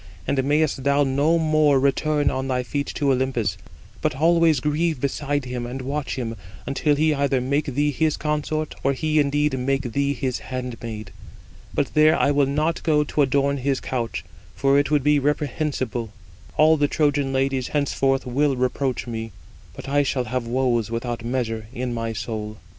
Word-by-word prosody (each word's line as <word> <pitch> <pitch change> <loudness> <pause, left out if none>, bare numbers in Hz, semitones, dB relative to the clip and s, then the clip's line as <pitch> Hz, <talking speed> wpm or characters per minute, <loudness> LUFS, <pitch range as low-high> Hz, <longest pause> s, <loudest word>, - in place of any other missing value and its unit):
And 135 -1 +1
mayest 145 -1 +1
thou 140 +1 +3
no 145 +5 +2
more 155 -3 +3
return 145 +2 +1
on 130 0 -2
thy 125 -1 0
feet 140 +4 -3
to 140 -2 +2
Olympus: 125 -7 0 0.5
but - - 0
always 165 0 +4
grieve 150 +2 0
beside 145 +1 -1
him, 125 -1 -4
and 125 +2 -5
watch 145 +2 -3
him, 115 -3 -4 0.3
until 145 +2 +1
he 155 +1 +2
either 140 -2 +1
make 140 +4 0
thee 145 +1 +2
his 155 +2 0
consort, 150 0 -2
or 135 - +2
he 155 +3 +1
indeed 145 -1 +1
[make 135 -1 -1
thee] 140 +3 +1
his 130 0 -2
handmaid. 115 -5 -6 0.6
But - - -1
there 155 +1 +5
I 145 - +3
will 140 -1 +3
not 155 +4 0
go 150 -2 +3
to 150 - -1
adorn 140 +1 +2
his 135 0 0
couch, 120 -3 -3 0.3
for 140 0 +3
it 145 - 0
would 150 -3 +2
be 150 0 +4
reprehensible: 140 -4 -1 0.5
all 155 +1 +5
the 145 -1 +2
Trojan 145 -2 +1
ladies 135 -1 0
henceforth 135 -2 0
will 135 +3 +1
reproach 130 +1 -1
me. 115 -2 -5 0.4
But - - -9
I 145 +1 +3
shall 135 -2 0
have 120 0 -3
woes 120 -3 +1
without 115 0 -3
measure 115 -3 -2
in 125 -1 -3
my 115 -1 -3
soul." 105 0 -5
135 Hz, 175 wpm, -23 LUFS, 125-150 Hz, 0.6 s, there